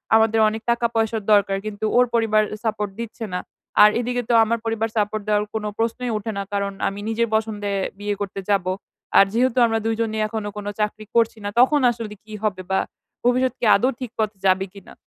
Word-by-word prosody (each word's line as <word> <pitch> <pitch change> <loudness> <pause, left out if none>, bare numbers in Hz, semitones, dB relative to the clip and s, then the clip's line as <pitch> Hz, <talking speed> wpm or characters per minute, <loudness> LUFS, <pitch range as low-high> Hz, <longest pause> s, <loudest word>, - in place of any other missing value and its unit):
আমাদের 225 0 +4
অনেক 220 +1 -5
টাকা-পয়সার 230 -2 0
দরকার, 200 -1 +3
কিন্তু 215 0 -4
ওর 250 - +6
পরিবার 225 -2 +3
এ - - -10
সাপোর্ট 210 -2 -1
দিচ্ছে 230 0 -5
না, 180 - 0 0.4
আর 210 - +9
এদিকে 245 +1 -1
তো - - +3
আমার 230 +1 0
পরিবার 225 0 -1
সাপোর্ট 210 0 0
দেওয়ার 210 -1 +2
কোন 220 - -2 0.2
প্রশ্নই 235 +2 -1
ওঠে 215 +1 -4
না 200 - -1
কারণ 200 0 0 0.2
আমি 195 +1 -4
নিজের 230 +1 +1
পছন্দে 210 -2 -1 0.3
বিয়ে 205 0 -2
করতে 200 -1 -4
যাব, 200 -3 +2 0.5
আর 195 - +8
যেহেতু 250 +2 +1
আমরা 225 -1 +1
২ 225 0 +1
জনই 220 -1 -1
এখনো 215 -1 -4
কোনো 205 0 -4
চাকরি 215 0 -2
করছি 230 -1 +3
না, - - -1
তখন 275 +4 +5
আসলে 230 -3 -6
কি 215 - -11
হবে? 195 -4 -1
বা, 190 - +3 0.4
ভবিষ্যৎ 250 +1 +2
কি - - -1
আদৌ 245 +6 +2
ঠিক 250 -4 -5
পথে 215 -2 -1
যাবে 190 +1 +3
কিনা? 200 -2 -13
220 Hz, 205 wpm, -22 LUFS, 205-230 Hz, 0.5 s, আর